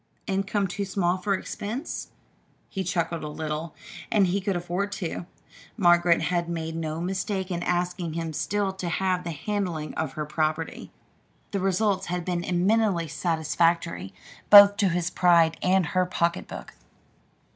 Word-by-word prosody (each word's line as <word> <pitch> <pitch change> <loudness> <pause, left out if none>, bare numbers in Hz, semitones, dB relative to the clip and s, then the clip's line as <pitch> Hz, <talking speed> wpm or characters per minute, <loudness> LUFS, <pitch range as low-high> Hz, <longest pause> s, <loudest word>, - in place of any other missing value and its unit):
Income 195 +1 0
too 200 +3 -3
small 185 -2 0
for 195 +2 0
expenses?" 225 - -5 0.6
He 190 - -3
chuckled 170 -2 -2
a - - -4
little, 155 +1 -4 0.4
and 205 -3 +4
he 190 +2 0
could 195 0 -1
afford 175 +3 -2
to. 170 -1 -4 0.5
Margaret 175 -4 +4
had 170 0 0
made 160 -1 -3
no 160 -1 -3
mistake 190 +1 -2
in 170 -1 -2
asking 175 -1 -1
him 165 -1 -3
still 200 +6 -1
to 185 -2 -4
have 185 +1 0
the 170 - -4
handling 170 -1 -3
of 160 -4 -3
her 150 +1 -3
property. 155 +1 -2 0.6
The 200 - -1
results 195 +1 +1
had 175 -1 -3
been 175 -1 -1
eminently 185 -1 +1
satisfactory 160 - 0 0.4
both 205 0 +10
to 200 -3 +3
his 175 0 -1
pride 170 -2 +4
and 185 0 +3
her 185 +3 +1
pocketbook. 170 -1 -2
175 Hz, 145 wpm, -26 LUFS, 165-190 Hz, 0.6 s, both